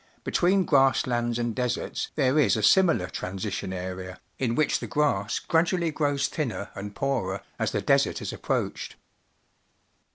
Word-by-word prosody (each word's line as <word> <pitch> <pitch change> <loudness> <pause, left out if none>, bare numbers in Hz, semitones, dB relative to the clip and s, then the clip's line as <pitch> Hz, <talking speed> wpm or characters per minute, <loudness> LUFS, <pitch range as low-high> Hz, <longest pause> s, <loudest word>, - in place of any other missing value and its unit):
Between 185 +1 +2
grass 135 -3 +4
lands 120 -1 -1
and 120 -1 -1
deserts 125 +1 -2
there 140 0 +2
is 135 -5 +3
a 110 - -2
similar 170 - +4
transition 95 +2 -4
area, 90 0 -6 0.2
in 120 -3 0
which 155 - +2
the - - -6
grass 115 -9 0
gradually 170 0 +1
grows 145 -2 0
thinner 120 -9 -4
and 100 +1 -7
poorer 115 -9 -1 0.2
as - - 0
the - - -2
desert - - +2
is - - -5
approached. - - -3
125 Hz, 150 wpm, -26 LUFS, 100-150 Hz, 0.2 s, grass